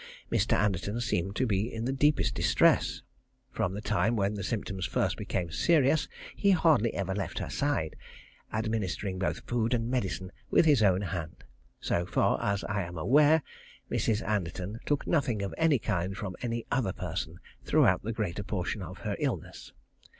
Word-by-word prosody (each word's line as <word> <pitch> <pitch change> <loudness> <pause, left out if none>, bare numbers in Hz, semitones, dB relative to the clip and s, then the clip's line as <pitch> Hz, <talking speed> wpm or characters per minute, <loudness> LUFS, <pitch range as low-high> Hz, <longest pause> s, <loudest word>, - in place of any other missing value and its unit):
Mr. - - +2
Anderton 105 +2 0
seemed 100 -5 -1
to 130 - +1
be 105 +1 0
in 115 0 -4
the 130 - 0
deepest 145 +3 +2
distress. - - +3 0.5
From 90 +1 -1
the 105 - -4
time 110 +2 +1
when 100 -1 +1
the 100 -2 -4
symptoms 100 -3 -3
first - - 0
became 85 -2 -3
serious, 150 - +3 0.3
he 200 - +2
hardly 160 - +4
ever 95 -1 -1
left 100 -1 -4
her - - -3
side, 140 - -1 0.6
administering 105 -3 -2
both 95 - -1
food 120 0 +1
and 115 +1 -2
medicine 95 -6 -2 0.2
with - - +5
his 145 -7 +5
own 95 -2 +4
hand. 85 -5 -5 0.4
So 85 0 -1
far - - +2
as 100 0 0
I 105 -1 -1
am 90 -1 -6
aware, 145 - +4 0.5
Mrs. 110 0 0
Anderton 100 +1 -2
took 145 -1 0
nothing 125 - +1
of 100 - -4
any 160 -3 +3
kind 95 -2 -2
from 100 -5 -5
any 115 -1 -2
other 115 -8 +1
person 80 +4 -4 0.3
throughout - - +4
the 110 - -3
greater 105 -4 -2
portion 95 +1 -3
of 90 - -7
her - - -2
illness. - - -4
105 Hz, 170 wpm, -29 LUFS, 95-120 Hz, 0.6 s, with